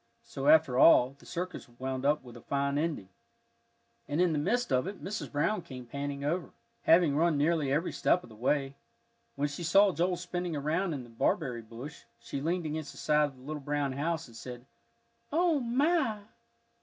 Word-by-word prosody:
So 135 +1 -5
after 155 -5 +5
all, 130 -4 +6
the - - -17
circus 180 -5 -5
wound 130 +1 -3
up 150 0 +2
with 120 -2 -12
a 120 - -11
fine 140 +2 -1
ending. 150 - -2 1.0
And 145 - -1
in 180 -2 +3
the 150 - 0
midst 235 - 0
of 130 +4 +2
it 195 0 -7
Mrs. 210 +3 -4
Brown 170 +7 0
came 130 -5 -9
panting 140 +3 -5
over, 170 +3 -2 0.3
having 165 -3 +5
run 165 0 +3
nearly 150 -1 +1
every 150 +6 +1
step 180 - +2
of - - -13
the 110 - -13
way. 135 +4 0 0.6
When 145 - 0
she 145 +4 -7
saw 195 +4 +5
Joel 180 +2 +1
spinning 175 -1 -3
around 160 +4 -1
in 130 - -6
The 120 - -14
Barberry 120 +1 0
Bush, 120 +4 -10
she 140 - -5
leaned 170 +3 -1
against 155 0 -4
the - - -15
side 150 0 +3
of 140 - -12
the 125 - -16
little 150 +1 -5
brown 145 -1 -1
house, 160 +5 -2
and 115 - -16
said, 120 +1 -9 0.7
"O 330 -1 +3
my!" 260 -2 +1
150 Hz, 195 wpm, -30 LUFS, 135-175 Hz, 1.0 s, all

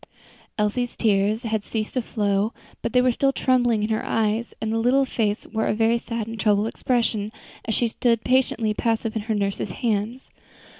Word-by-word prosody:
Elsie's 230 +3 0
tears 210 +1 +2
had 220 -2 -1
ceased 215 -1 -3
to 255 - +1
flow, 205 -1 0 0.3
but - - -2
they 250 -1 +4
were 255 - +4
still 275 +3 +2
trembling 245 -5 +2
in 215 - -1
her 220 - 0
eyes, 225 +1 0
and 220 - -2
the 225 - +1
little 260 +4 +3
face 215 -5 -1
wore 220 0 -1
a - - +1
very 225 +2 +3
sad 230 -2 -4
and 225 0 -7
troubled 210 -1 +3
expression 225 -3 0 0.3
as 220 - -1
she 240 - +1
stood 230 0 +1
patiently 245 -4 +2
passive 225 0 -1
in 220 - -1
her 220 +1 -2
nurse's 200 -1 -1
hands. 225 +4 -2
225 Hz, 190 wpm, -24 LUFS, 210-240 Hz, 0.3 s, they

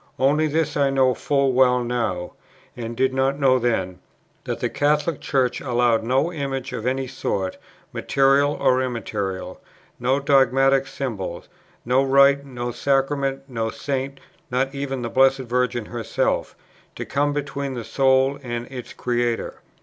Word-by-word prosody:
Only 145 +4 +3
this 155 0 -1
I 140 -1 +2
know 130 -1 +3
full 140 0 +1
well 125 -1 +4
now, 110 -8 -2 0.4
and 115 -1 -6
did 130 0 +2
not 135 +1 +1
know 130 -2 +4
then, 95 -7 -1 0.5
that - - -3
the - - 0
Catholic 150 +2 0
Church 130 -3 0
allows 120 -3 +2
no 135 +9 0
image 135 -4 -4
of 115 - -3
any 130 +1 0
sort, 100 -7 -3 0.3
material 140 +1 +3
or 130 -2 +2
immaterial, 105 -6 -4 0.4
no 130 +3 +1
dogmatic 135 -1 +3
symbol, 110 -10 -5 0.4
no 125 +3 +3
rite, 140 +1 +5
no 120 -3 -5
sacrament, 135 +1 0
no 115 -4 -2
Saint, 135 +2 -4 0.3
not 135 +2 0
even 135 -2 -4
the 115 - -3
Blessed 135 0 +4
Virgin 125 -2 -1
herself, 115 -1 -2 0.4
to - - -5
come 145 +1 0
between 140 -2 -3
the 120 - -4
soul 135 +3 +2
and 120 -2 -4
its 125 -2 -8
Creator. 120 -1 -2
130 Hz, 145 wpm, -23 LUFS, 120-140 Hz, 0.5 s, rite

